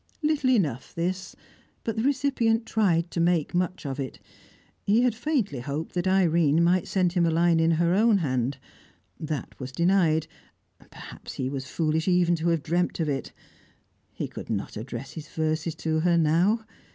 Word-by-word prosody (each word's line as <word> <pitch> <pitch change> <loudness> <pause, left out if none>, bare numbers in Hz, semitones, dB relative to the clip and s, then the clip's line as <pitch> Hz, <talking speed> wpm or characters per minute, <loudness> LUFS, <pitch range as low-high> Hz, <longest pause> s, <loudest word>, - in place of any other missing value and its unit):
Little 300 -3 +2
enough, 155 - 0
this, 185 +2 -3 0.5
but 225 - -2
the 220 - -1
recipient 255 -4 +1
tried 180 -7 +1
to - - -3
make 170 -2 +1
much 180 -1 -1
of 135 0 -4
it. 135 -2 -5 0.7
He 215 +4 +3
had 250 -3 +3
faintly 235 - -1
hoped 145 +5 -4
that 175 +1 -1
Irene 170 -4 +3
might 175 +1 +2
send 180 -3 +1
him 175 -2 +2
a 165 - +3
line 165 0 +3
in 165 0 +3
her 170 +2 +2
own 215 +2 +4
hand. 130 -5 -1 0.6
That 155 -2 -4
was 130 -1 -6
denied, 170 0 +2 0.5
and - - -22
perhaps - - -10
he 130 - -3
was 135 -2 -5
foolish 160 +2 -1
even 180 -1 +3
to 165 +1 -2
have 165 -3 0
dreamt 175 +3 0
of 160 -2 0
it. 135 -3 -3 0.8
He - - -4
could - - -9
not 105 -3 -3
address 120 +4 -6
his 155 -2 -8
verses 160 0 -2
to 160 0 -1
her, 170 +1 +3
now. 175 +8 +2
170 Hz, 175 wpm, -26 LUFS, 155-190 Hz, 0.8 s, own